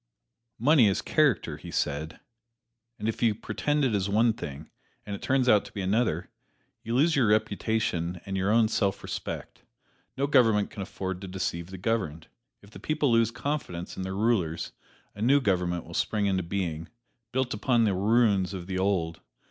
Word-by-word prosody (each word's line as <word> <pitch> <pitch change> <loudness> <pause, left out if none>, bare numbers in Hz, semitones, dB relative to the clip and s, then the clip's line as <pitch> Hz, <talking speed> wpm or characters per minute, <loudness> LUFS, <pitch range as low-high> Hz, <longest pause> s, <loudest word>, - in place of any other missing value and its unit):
"Money 135 -1 +5
is 100 - +1
character," 145 - +1
he - - -10
said, 75 +2 -2 0.8
"and 105 - -3
if 115 - -2
you 115 -3 +3
pretend 145 +6 -1
it 125 - +1
is 100 -1 0
one 110 +3 +3
thing, 75 -7 -7 0.4
and 100 - -4
it - - -10
turns 130 -1 +1
out 105 -4 +5
to - - -12
be 100 - -5
another, 110 +5 0 0.5
you 115 +2 -3
lose 155 +5 +4
your 130 -5 +3
reputation 105 -4 0
and 95 - -4
your 95 +1 0
own 110 0 +4
self 100 -3 0
respect. - - -6 0.6
No 135 - +1
government 115 -7 +3
can 100 - -7
afford 95 -1 -5
to 95 - -6
deceive 90 -2 -3
the 95 - -8
governed. 90 -6 -2 0.3
If 100 - -16
the - - -11
people 150 -4 0
lose 115 -1 +4
confidence 115 - -4
in - - -5
their 95 0 -4
rulers, 95 -7 0 0.4
a 105 - -10
new 135 +5 +5
government 90 -7 0
will - - -11
spring 105 -2 0
into 95 -2 +1
being, 85 -3 -3 0.4
built 130 0 0
upon 115 +2 +2
the 105 -3 +2
ruins 100 -1 +2
of 90 -2 -6
the 95 0 -3
old. 90 -4 0
105 Hz, 180 wpm, -27 LUFS, 95-115 Hz, 0.8 s, Money